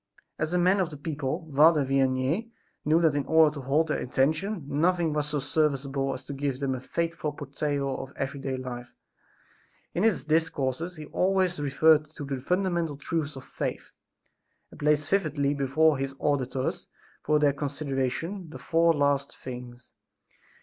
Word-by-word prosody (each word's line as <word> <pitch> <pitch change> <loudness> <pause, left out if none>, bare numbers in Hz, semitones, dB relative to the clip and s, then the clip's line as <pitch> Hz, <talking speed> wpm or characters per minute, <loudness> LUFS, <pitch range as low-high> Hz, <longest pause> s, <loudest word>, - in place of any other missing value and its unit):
As 155 +1 -1
a 180 - +2
man 185 +3 +4
of 180 -4 +1
the 150 - -9
people, 150 +2 -3
Father 150 0 +6
Vianney 135 - +1 0.3
knew 155 +2 +4
that 160 -3 +4
in 145 -1 0
order 160 -2 +5
to 145 - -6
hold 150 +5 +1
their - - 0
attention 155 - 0
nothing 165 +2 +1
was 150 -1 -1
so 150 0 -1
serviceable 135 -2 0
as 130 +1 -9
to 140 - -6
give 135 -1 -2
them 135 -2 0
a 130 - -4
faithful 165 +1 -2
portrayal 140 -1 -2
of 135 - -9
every 140 +1 -3
day 135 -1 -3
life. 125 -1 -7 1.0
In 175 - -1
his 210 -10 +2
discourses 155 +1 0
he 155 -2 -8
always 185 0 +1
reverted 150 +2 +4
to 145 - -6
the 135 -1 -3
fundamental 170 0 0
truths 150 0 -2
of 135 - -9
faith - - -4 0.8
and - - -14
placed 150 0 +2
vividly 150 -7 +1
before 145 +2 +2
his 135 0 -3
auditors 135 -2 -1 0.3
for 150 0 +2
their 145 -1 +3
consideration, 145 +5 -3
the - - -8
four 165 0 +3
last 140 -1 +1
things. 125 -1 -9
145 Hz, 165 wpm, -27 LUFS, 135-160 Hz, 1.0 s, Father